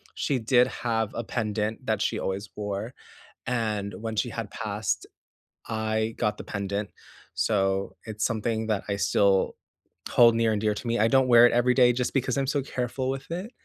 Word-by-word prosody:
she 135 -3 0
did 120 +2 +4
have 115 -4 -2
a 115 - -2
pendant 110 +1 -2
that 110 -3 0
she - - 0
always 95 +2 -3
wore, 105 +3 -4 0.5
and 110 -4 -1
when 110 0 -4
she 120 +3 0
had 115 -3 -5
passed, 105 -2 -3 0.6
I 110 0 -1
got 105 -1 0
the - - -7
pendant. 100 0 -3 0.5
So, 95 +1 0
it's 110 -1 -4
something 110 0 -1
that 105 -3 0
I 100 - -1
still 100 -1 +2 0.5
hold 115 -1 +6
near 115 -1 +2
and 105 -1 -1
dear 105 -1 +2
to 105 - -7
me. 115 -1 0
I 110 - +4
don't 130 +2 +4
wear 120 -1 +8
it - - 0
every 120 +1 +3
day, 125 -1 +5
just 125 0 -2
because 130 -1 0
I'm 135 - +1
so 140 +1 +1
careful 130 0 -3
with 135 0 -4
it, 185 +7 -4
110 Hz, 190 wpm, -26 LUFS, 105-125 Hz, 0.6 s, wear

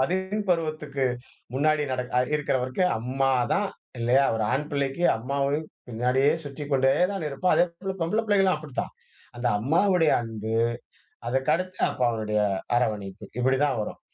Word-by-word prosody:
பள்ளி 190 +8 0
பருவத்துக்கு 155 -4 -1 0.5
முன்னாடி 155 +2 +2
நடக் 125 0 -3
அ - - +6 0.2
இருக்குறவரைக்கும் 135 +4 0
அம்மாதான் 130 - +1 0.3
இல்லையா? 125 +4 +4
ஒரு 110 - 0
ஆண் 150 +3 -1
பிள்ளைக்கு 140 +3 -1
அம்மாவை 140 +4 -1 0.3
பின்னாடியே 125 +4 +2
சுற்றிக்கொண்டேதான் 145 +6 0
இருப்பான். 145 +6 +1
அதேபோல 180 +2 0
பொம்பள 175 +7 +1
பிள்ளைகளும் 195 -3 +3
அப்டித்தான். 150 -4 -5 0.5
அந்த 120 0 0
அம்மாவுடைய 165 - +3
அன்பு, 110 -1 -5 0.7
அதுக்கடுத்து 155 +9 0
அப்பாவினுடைய 110 -4 0 0.4
அரவணைப்பு. 105 -4 -1
இப்படிதான் 130 +1 +2
வரும். - - -6
140 Hz, 115 wpm, -26 LUFS, 125-165 Hz, 0.7 s, அ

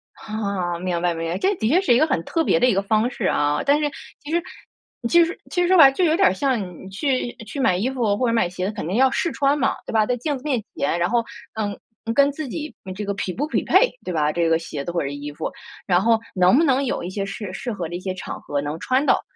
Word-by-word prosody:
啊， 200 -5 -3
明 175 -2 -2
白， 175 -1 +1
明 165 0 -4
白， 180 - -1
这 395 - +1
的 220 - -1
确 345 +6 +4
是 245 - +3
一 240 - +4
个 310 - +4
很 170 - 0
特 325 - 0
别 245 - +2
的 250 - +4
一 245 - +3
个 195 - +1
方 220 +4 +1
式 235 - -4
啊。 145 -4 +1
但 285 +2 +4
是 295 - +1 0.3
其 295 - -7
实 340 +1 +2 0.7
其 340 +6 +6
实 330 - -3
其 355 - 0
实 350 - +2
说 375 0 +5
白， 275 -4 +9
就 360 +7 0
有 320 -1 +4
点 385 +1 +5
儿 - - +2
像 215 - -2
你 190 - -9
去 255 +3 -1
去 275 +7 -7
买 185 -9 +3
衣 235 +7 0
服 225 -6 0
或 250 - +1
者 230 - +1
买 205 -7 +2
鞋 180 +1 -4
子， - - -2
肯 155 - -5
定 190 - -2
要 265 0 +5
试 340 +4 0
穿 280 +1 +2
嘛， 270 -1 +1
对 - - -6
吧？ 215 -1 +4
在 245 +1 -1
镜 290 +2 -2
子 255 - -14
面 255 -8 -1
前， 165 +4 0
然 175 - +1
后， 235 0 +2 0.3
嗯， 205 -2 -3 0.4
跟 280 0 +5
自 295 0 -5
己 305 +2 -6
嗯 185 - -5
这 205 +2 -5
个 200 - -1
匹 190 -1 -3
不 290 +4 -2
匹 - - 0
配， - - +4
对 180 - -4
吧？ 150 -1 +1
这 170 0 +1
个 165 - +4
鞋 150 -4 -6
子 175 - -4
或 170 - -1
者 140 - -2
是 140 - -5
衣 145 +1 -6
服， - - -4 0.3
然 180 0 +3
后 225 +1 +3 0.2
能 185 +6 +5
不 330 - +4
能 275 -2 +3
有 255 - -2
一 175 - -4
些 195 +1 -3
适 195 -1 -6
适 240 +5 -4
合 180 -6 -4
的 175 - -6
一 - - -4
些 185 0 -3
场 - - -7
合 145 - -2
能 150 +3 -4
穿 260 +3 +1
到， - - +3
220 Hz, 315 characters per minute, -22 LUFS, 180-275 Hz, 0.7 s, 白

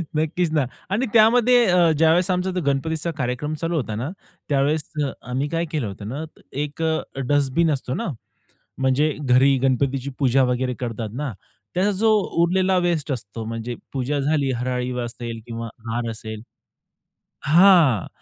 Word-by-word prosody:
नक्कीच 160 +2 0
ना. 150 -4 +2 0.2
आणि 215 +7 +1
त्यामध्ये 240 +2 +5
अ, 175 -2 +5
ज्यावेळेस 165 +4 +3
आमचा 180 +1 0 0.2
गणपतीचा 160 +4 -1
कार्यक्रम 125 +3 -2
चालू 165 +2 -2
होता 115 -8 -2
ना, 120 +7 -3 0.4
त्यावेळेस 145 +2 +2 0.2
अ, 135 - -2 0.2
आम्ही 130 +3 -1
काय 165 +1 -1
केलं 145 -9 -1
होतं 100 +1 -7
ना, 140 +6 -4 0.4
एक 150 +3 -7
अ, 160 0 +1 0.3
डस्टबिन 145 +3 +2
असतो 130 -3 -2
ना. - - -3 0.7
म्हणजे 135 +4 +2
घरी 135 0 +4
गणपतीची 135 0 +1
पूजा 135 -1 +3
वगैरे 125 0 0
करतात 115 -3 -4
ना, 135 0 -3 0.4
त्याचा 190 +3 +2
जो 220 +3 +3 0.3
उरलेला 185 +2 +2
वेस्ट 165 -4 0
असतो, 115 -3 -5
म्हणजे 115 +2 -4 0.2
पूजा 140 +2 -1
झाली, 140 -1 +1
हराळी 125 0 -2
असेल 120 -1 -5
किंवा 115 0 -5 0.2
हार 115 +1 -2
असेल. 110 -1 -7 1.0
हां. 165 - +5
140 Hz, 150 wpm, -22 LUFS, 125-165 Hz, 1.0 s, त्यामध्ये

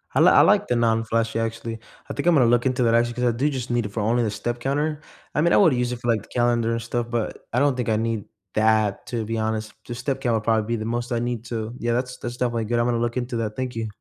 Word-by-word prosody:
I - - +4
l - - +6
I - - +7
like - - +4
the 125 - +1
non-flashy, 115 0 +1
actually. 115 0 -3 0.3
I - - -3
think 140 - -3
I'm 175 - +6
gonna 125 -4 +5
look 120 +2 +3
into 130 -1 +1
that, 115 -1 +3
actually, 120 0 +2
'cause 125 +1 -3
I 120 - +4
do 145 +4 +2
just 130 -3 -4
need 120 -2 +1
it - - -4
for 110 +1 -2
only 115 +3 +2
the 105 - -1
step 120 +3 -3
counter. 145 +4 -1 0.3
I - - +3
mean, 170 +2 +3
I - - +6
woulda 165 -9 +5
used 125 0 0
it 120 - -6
for, 120 - -2
like, 110 -3 0
the - - -17
calendar 120 -1 +1
and 115 0 -1
stuff, 120 0 -3
but 120 -2 -3
I 125 - +2
don't 140 -2 +2
think 125 - -2
I 110 - +3
need 110 -2 -1 0.3
that, 110 -1 +2
to 120 -3 -2
be 115 +1 -3
honest. 110 0 -2
The 120 - -5
step 135 +2 -2
count 125 -3 0
would 110 - -1
probably 110 -1 +1
be 115 - 0
the 110 - -4
most 120 +2 -3
I 115 - +1
need 120 -1 -3
to 115 -1 -4
yeah. 120 0 0
That's 125 +1 -2
that's 120 0 -5
definitely 120 -3 -1
good. 120 +2 0
I'm 120 - +2
gonna 120 -1 +1
look 120 +1 -1
into 120 -1 -2
that, 110 -2 -3
thank 130 -2 -4
you. 115 -1 -2
120 Hz, 305 wpm, -24 LUFS, 115-125 Hz, 0.3 s, I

